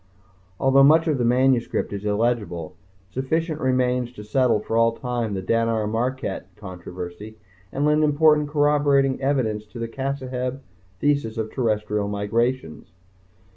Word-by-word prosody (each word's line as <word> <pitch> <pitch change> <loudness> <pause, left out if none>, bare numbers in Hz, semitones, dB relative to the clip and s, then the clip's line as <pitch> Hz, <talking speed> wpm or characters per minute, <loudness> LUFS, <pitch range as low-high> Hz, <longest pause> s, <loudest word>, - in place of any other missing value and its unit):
Although 135 +1 +4
much 160 +3 +5
of 150 -4 +1
the - - +1
manuscript 125 -2 +1
is 100 +1 -5
illegible, 105 -6 -1 0.4
sufficient 155 - -2
remains 125 -1 +1
to 105 - -10
settle 115 0 +2
for 115 - -4
all 115 0 +4
time 120 -3 -3
the 95 - -4
Dannar 115 +1 +1
Marraket 115 -2 -2
Controversy 90 +2 -8 0.3
and 140 +2 -1
lend 150 +1 +3
important 150 0 +3
corroborating 145 -2 +2
evidence 125 -6 0
to 110 - -12
the 115 0 -3
Cassaheb 130 0 -4 0.4
Thesis 140 -6 0
of 110 -1 -3
Terrestrial 105 -4 -1
migrations. 105 -3 -2
120 Hz, 135 wpm, -23 LUFS, 105-135 Hz, 0.4 s, much